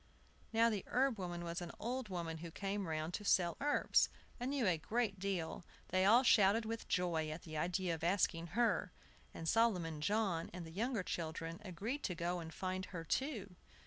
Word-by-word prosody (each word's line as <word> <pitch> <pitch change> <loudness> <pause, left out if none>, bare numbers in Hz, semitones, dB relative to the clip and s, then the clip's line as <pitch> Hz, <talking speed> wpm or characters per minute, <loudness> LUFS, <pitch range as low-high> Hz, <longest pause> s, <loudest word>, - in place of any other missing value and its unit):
Now, 230 +1 +4
the 205 -3 -2
herb 255 -3 +2
woman 175 -2 -4
was 170 +1 -3
an 175 - -5
old 245 0 -3
woman 170 -3 -3
who 170 +1 -6
came 195 +2 -3
round 160 +1 -2
to 210 - -3
sell 175 -4 +3
herbs, 290 +1 +3 0.3
and 245 +2 -2
knew 275 -4 +1
a 175 -4 +3
great 215 +2 -1
deal. 185 -4 -2 0.3
They 185 0 +3
all 235 +6 +7
shouted 220 -1 +5
with 225 +1 -4
joy 170 -4 +1
at 155 +2 -6
the 155 -2 -8
idea 180 +3 0
of 165 0 -5
asking 170 -2 +2
her, 240 -1 +2 0.4
and 165 - -6
Solomon 180 -8 +2
John 195 -2 +1
and 180 -1 -6
the 160 - -9
younger 225 +3 -1
children 165 0 -4
agreed 210 - -3
to 180 - -1
go 175 +1 -1
and 160 -1 -7
find 185 +2 -3
her 180 -3 -6
too. 210 - -2
185 Hz, 190 wpm, -37 LUFS, 170-220 Hz, 0.4 s, all